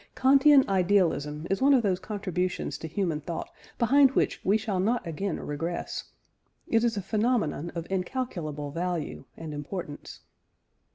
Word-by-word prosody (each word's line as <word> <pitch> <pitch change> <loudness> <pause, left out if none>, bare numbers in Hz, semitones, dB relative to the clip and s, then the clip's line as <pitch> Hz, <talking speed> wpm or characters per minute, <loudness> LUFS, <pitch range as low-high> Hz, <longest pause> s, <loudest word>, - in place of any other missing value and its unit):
Kantian 275 +1 +6
idealism 175 -6 +1
is 195 - 0
one 275 +1 +6
of 245 - +3
those 185 -3 +1
contributions 185 -4 -3
to 160 - -5
human 165 -2 -1
thought 165 +2 -5 0.3
behind 270 +3 +5
which - - +1
we 200 +3 +3
shall 210 -3 -2
not 230 +6 +1
again 170 +3 -3
regress. 165 +4 -4 0.6
It 225 0 +2
is 230 -3 +1
a 200 - -2
phenomenon 210 - 0
of 165 -1 -4
incalculable 180 - -3
value 170 -3 -3
and 160 -2 -6
importance. 150 +1 -7
185 Hz, 145 wpm, -28 LUFS, 165-225 Hz, 0.6 s, Kantian